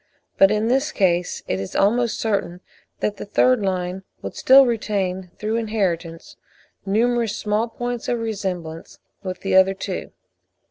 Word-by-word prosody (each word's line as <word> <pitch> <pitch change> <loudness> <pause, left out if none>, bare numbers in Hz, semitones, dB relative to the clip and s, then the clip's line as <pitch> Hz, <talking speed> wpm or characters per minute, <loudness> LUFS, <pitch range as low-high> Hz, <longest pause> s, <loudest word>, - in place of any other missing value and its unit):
But 195 - +7
in 215 +1 +1
this 270 +5 +1
case 180 -5 0
it 95 - -1
is 95 -1 -6
almost 230 +3 +2
certain 195 -5 -1 0.4
that 205 -1 -1
the - - -6
third 250 +3 +3
line 185 -1 -2 0.2
would - - -6
still 270 +1 +7
retain 195 -6 -2
through 215 +2 -1
inheritance 185 -7 -2 0.5
numerous 230 +1 +1
small 210 +2 0
points 240 +1 -4
of 240 - 0
resemblance 185 -8 -5 0.2
with 185 -1 -6
the 195 - 0
other 190 +1 +5
two. 190 -1 -5
205 Hz, 145 wpm, -22 LUFS, 185-230 Hz, 0.5 s, But